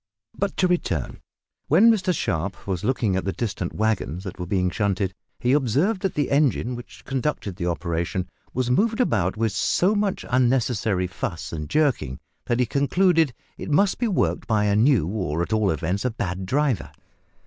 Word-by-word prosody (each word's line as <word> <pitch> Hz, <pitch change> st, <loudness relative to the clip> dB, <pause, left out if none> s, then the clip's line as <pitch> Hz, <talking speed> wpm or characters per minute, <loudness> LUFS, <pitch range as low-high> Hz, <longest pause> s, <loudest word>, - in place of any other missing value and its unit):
But 200 Hz, -1 st, -2 dB
to 185 Hz, -, +3 dB
return. 95 Hz, -, -1 dB, 0.5 s
When 205 Hz, +10 st, +6 dB
Mr 190 Hz, -4 st, +1 dB
Sharp 95 Hz, -, -2 dB
was 95 Hz, -1 st, -3 dB
looking 110 Hz, -4 st, +1 dB
at 95 Hz, -, 0 dB
the 95 Hz, -, -1 dB
distant 95 Hz, -5 st, -3 dB
waggons 105 Hz, -5 st, -1 dB
that 95 Hz, -2 st, -7 dB
were 90 Hz, -, -4 dB
being 90 Hz, -1 st, +1 dB
shunted 100 Hz, -2 st, 0 dB, 0.3 s
he 125 Hz, +1 st, +2 dB
observed 145 Hz, -, +2 dB
that 195 Hz, -, -1 dB
the 145 Hz, -2 st, 0 dB
engine 140 Hz, -3 st, +2 dB
which 120 Hz, 0 st, -11 dB
conducted 135 Hz, -8 st, -2 dB
the 85 Hz, -, -2 dB
operation 85 Hz, +1 st, -2 dB, 0.2 s
was 125 Hz, -1 st, -1 dB
moved 220 Hz, -, +2 dB
about 105 Hz, -, +1 dB
with 110 Hz, -1 st, +1 dB
so 145 Hz, -, +2 dB
much 205 Hz, -2 st, -1 dB
unnecessary 120 Hz, -6 st, +1 dB
fuss 90 Hz, -2 st, -5 dB
and 75 Hz, -2 st, -5 dB
jerking 135 Hz, -, +1 dB, 0.3 s
that 120 Hz, 0 st, 0 dB
he 125 Hz, -, +3 dB
concluded 160 Hz, -, +2 dB, 0.2 s
it -, -, -5 dB
must 185 Hz, +6 st, +3 dB
be 240 Hz, -, +1 dB
worked 195 Hz, -, 0 dB
by 110 Hz, -2 st, +2 dB
a 100 Hz, -1 st, +2 dB
new, 115 Hz, -, +4 dB
or 85 Hz, -4 st, -1 dB
at 105 Hz, -, -3 dB
all 110 Hz, -2 st, +2 dB
events 90 Hz, +5 st, -1 dB
a 125 Hz, -, +1 dB
bad, 95 Hz, -4 st, -4 dB
driver. 135 Hz, -1 st, 0 dB
115 Hz, 180 wpm, -24 LUFS, 95-145 Hz, 0.5 s, When